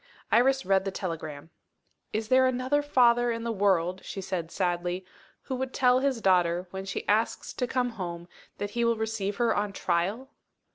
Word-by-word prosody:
Iris 265 +3 +4
read 190 0 +3
the 195 - -2
telegram. 165 -5 -6 0.6
"Is 220 0 -3
there 260 0 +5
another 255 +3 +1
father 240 -4 +4
in 230 0 -3
the 235 - -1
world," 190 -3 +1
she 195 - -6
said 180 -3 -3
sadly, 175 0 -2 0.4
"who - - -5
would 260 0 -3
tell 250 -1 +4
his 265 -3 0
daughter, 180 -2 +3
when 190 0 -5
she 195 - -5
asks 215 +2 0
to 250 - -2
come 250 0 0
home, 175 -5 -6 0.3
that 205 0 -4
he 235 +2 0
will 235 -1 +2
receive 220 -2 -2
her 235 0 +1
on 205 -1 -1
trial?" 200 +11 -1
205 Hz, 180 wpm, -28 LUFS, 185-245 Hz, 0.6 s, there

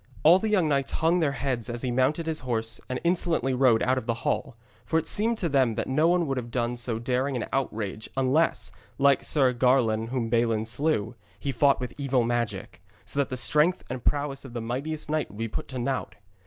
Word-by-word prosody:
All 170 +4 +7
the 220 - -1
young 190 -6 +3
knights 140 -2 0
hung 165 +3 +2
their 150 -4 +1
heads 130 -5 -3
as 120 +1 -4
he 125 - -1
mounted 130 +7 +1
his 160 -1 -2
horse 115 -2 -2
and 130 - -2
insolently 170 -6 +1
rode 125 -3 +4
out 130 +1 +2
of 110 - -12
the 115 - 0
hall; 135 -6 -1 0.3
for 160 - 0
it 165 - 0
seemed 225 +2 0
to 180 - -1
them 130 -6 +2
that - - -2
no 150 +5 +2
one 175 0 +2
would 135 -3 -2
have 120 -2 -4
done 120 0 -1
so 120 -1 -2
daring 130 +3 -1
an 120 - -2
outrage 110 -5 -3
unless, 135 +5 +1 0.3
like 140 -1 +4
Sir 135 -4 +2
Garlon 120 -3 +2
whom 120 -1 -2
Balin 115 -1 +1
slew, 125 -2 0 0.3
he 140 - -2
fought 140 0 +3
with 125 -2 -5
evil 135 -3 +1
magic, 115 -6 -3 0.2
so 140 - 0
that 140 - +1
the 130 - -4
strength 150 +8 +2
and 130 -2 -5
prowess 145 -1 -1
of 135 -4 -11
the 120 - -3
mightiest 140 +7 -4
knight 155 -2 -1
would 105 - -13
be 115 +1 -2
put 110 - -5
to 130 - -6
naught. 130 +2 -2
130 Hz, 220 wpm, -26 LUFS, 120-150 Hz, 0.3 s, All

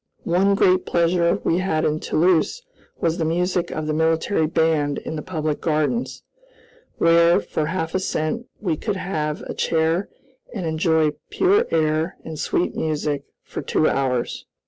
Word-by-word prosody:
One 190 +3 +3
great 185 -1 +3
pleasure 170 0 +2
we 170 - +1
had 160 -4 0
in 155 0 0
Toulouse 180 - +1 0.4
was 165 +1 0
the - - +1
music 175 +2 0
of 155 - -4
the 155 - -1
military 160 +2 +1
band 160 -3 +1
in 160 - -5
the 150 - -4
public 155 -3 -3
gardens, 155 +9 -1 0.7
where, 170 +1 +5
for 150 - -3
half 160 -1 -3
a 185 - +1
cent, 185 +6 -2
we 170 -7 -1
could 210 +3 -2
have 155 -5 -3
a - - -6
chair 165 +3 0 0.5
and 190 -5 -3
enjoy 160 -1 +2 0.2
pure 405 +5 +3
air 155 +2 0
and 160 -2 -6
sweet 175 - 0
music 150 -2 -2 0.2
for - - -6
two - - +1
hours. 130 -3 -1
165 Hz, 155 wpm, -22 LUFS, 155-180 Hz, 0.7 s, where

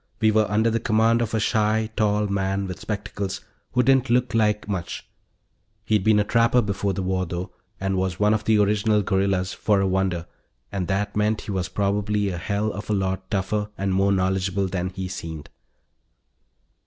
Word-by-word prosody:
We 110 -1 +4
were 110 -1 +2
under 110 +2 +2
the 115 - +1
command 115 +1 +2
of 115 -1 -1
a - - +2
shy, 110 0 +1
tall 105 -1 +2
man 100 0 -1
with 90 -1 -6
spectacles 100 -2 -4 0.3
who 125 - +3
didn't 135 0 +3
look 125 0 +2
like 105 -2 +1
much, 95 -5 -4 0.8
he'd 105 -3 +2
been 110 0 +4
a - - +3
trapper 115 +2 +3
before 100 -1 -1
the 95 - -3
war, 95 -1 -1
though, 90 +2 -5 0.3
and 95 0 -1
was 95 -1 -1
one 105 +1 +4
of 110 0 0
the 110 -1 +4
original 105 +1 +2
guerrillas, 95 -1 0
for 105 -2 +1
a 95 - +2
wonder, 95 -3 0 0.5
and 95 -3 -2
that 105 +3 -1
meant 105 +1 +1
he - - -6
was 95 -2 -2
probably 105 0 0
a 90 -2 -4
hell 105 +4 -1
of 105 +2 -7
a - - +2
lot 95 -1 -2
tougher 105 +1 -1
and 95 -1 -1
more 100 +1 +3
knowledgeable 95 0 0
than 90 -1 -2
he 95 0 -5
seemed. 80 -5 -7
100 Hz, 190 wpm, -24 LUFS, 95-110 Hz, 0.8 s, We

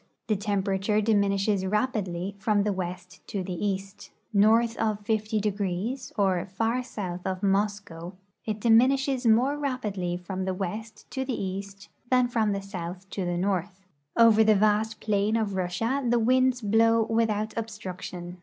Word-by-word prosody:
The 215 - +1
tem])erature 200 +1 0
diminishes 200 -2 +2
rapidly 195 -3 -1
from 205 0 +2
the 210 0 0
west 180 0 -6
to 195 -2 -3
the 180 0 -4
east. 195 0 -3 0.2
North 225 +3 +4
of 215 -2 -1
50°, 210 +1 -1
or 190 -4 +2
far 225 +6 -1
south 185 -7 -5
of 190 +1 -3
Moscow, 195 -3 -1 0.3
it 215 -1 -3
diminishes 255 +3 +3
more 250 +6 +4
rapidly 205 -11 -2
from 185 +1 -5
the 190 -1 -1
west 215 +4 -5
to 265 - -2
the 260 -2 -3
east 195 +1 -6 0.2
than 250 -1 +4
from 225 -3 +1
the 200 -1 -2
south 185 -1 -7
to 190 - -3
the 175 0 -1
north. 190 +1 -2 0.3
Over 225 -2 +7
the 215 0 +5
vast 215 +2 +2
plain 210 0 +1
of 215 -3 0
Russia 190 +9 -1
the 240 - +3
winds 255 +2 +3
blow 225 +2 +4
without 220 -1 0
obstruc 210 -5 -6
tion. 175 0 -7
205 Hz, 155 wpm, -27 LUFS, 190-225 Hz, 0.3 s, Over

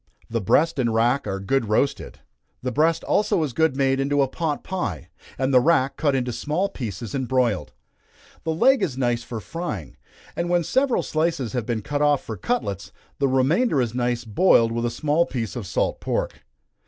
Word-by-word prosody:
The 115 -1 0
breast 150 - +2
and 120 -3 +1
rack 120 +3 +1
are 95 -1 -2
good 115 +3 0
roasted. 125 +6 -1 0.4
The 125 - -1
breast 160 +5 +2
also 200 -5 +1
is 140 -5 -3
good 160 -2 +1
made 135 -1 +2
into 140 +1 +2
a - - 0
pot 155 +2 -3
pie, 105 - -4 0.3
and 135 +1 0
the 125 - +8
rack 140 -1 +2
cut 145 -3 +1
into 125 -1 -1
small 155 +11 -1
pieces 115 - -6
and 130 -3 -2
broiled. 125 -6 0 0.7
The - - -3
leg 250 +11 +4
is 130 -4 -1
nice 120 -2 0
for 115 -1 -6
frying, 105 - -6 0.4
and 170 0 -2
when 175 -1 +2
several 260 - +1
slices 155 -8 -1
have 120 -3 -2
been 115 -3 -2
cut 145 +4 -2
off 145 -1 +3
for 110 - -5
cutlets, 105 - -3 0.3
the 140 - +3
remainder 140 - +2
is 120 -3 0
nice 120 -1 -1
boiled 115 - +4
with 115 +1 -1
a - - 0
small 150 +7 +1
piece 115 -5 -4
of 115 -6 -5
salt - - -1
pork. - - -3
130 Hz, 190 wpm, -23 LUFS, 115-160 Hz, 0.7 s, the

